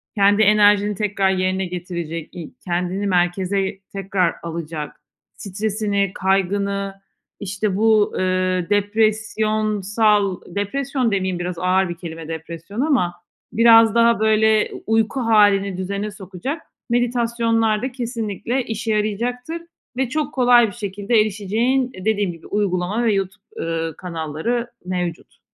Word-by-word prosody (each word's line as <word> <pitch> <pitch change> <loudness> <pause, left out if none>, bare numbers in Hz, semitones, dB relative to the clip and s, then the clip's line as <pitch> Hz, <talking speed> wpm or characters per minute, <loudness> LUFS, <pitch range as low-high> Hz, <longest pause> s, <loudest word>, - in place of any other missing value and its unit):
kendi 205 +1 +4
enerjini 210 -1 +4
tekrar 200 -1 0
yerine 185 0 0
getirecek, 170 -2 -5
i 170 -3 -8
kendini 180 +3 -1
merkeze 190 +2 0
tekrar 195 -3 0
alacak, 160 -2 -6 0.3
stresini, 200 -1 -1
kaygını, 195 +1 0 0.4
işte, 200 0 -2
bu, 215 0 +3
ııı, 185 -1 0
depresyonsal, 215 -1 +1
depresyon 245 +6 -1
demeyeyim 190 -2 -1
biraz 175 -1 -4
ağır 185 +1 +2
bir 175 - -4
kelime 165 -2 -8
depresyon 165 +6 -6
ama 260 - +1 0.4
biraz 225 -1 +6
daha 235 -1 +4
böyle 220 0 +3
u - - -9
uyku 225 +4 +1
hâlini 205 -4 +3
düzene 200 +3 -3
sokacak 200 - -6 0.3
meditasyonlar 230 -2 +1
da 260 - -3
kesinlikle 240 0 -3
işe 225 -1 -3
yarayacaktır 245 +9 -2 0.4
ve 260 -2 0
çok 305 +1 -2
kolay 245 -2 +5
bir - - -6
şekilde 205 +1 0
erişeceğin, 220 +6 0
eee, 185 - -10
dediğim 205 -4 +1
gibi 165 -1 -13
uygulama 200 +2 0
ve 225 -2 +3
YouTube, 195 +1 -3
ııı, 165 -1 -3
kanalları 180 +8 -3
mevcut. 180 -2 -4
205 Hz, 120 wpm, -21 LUFS, 185-225 Hz, 0.4 s, biraz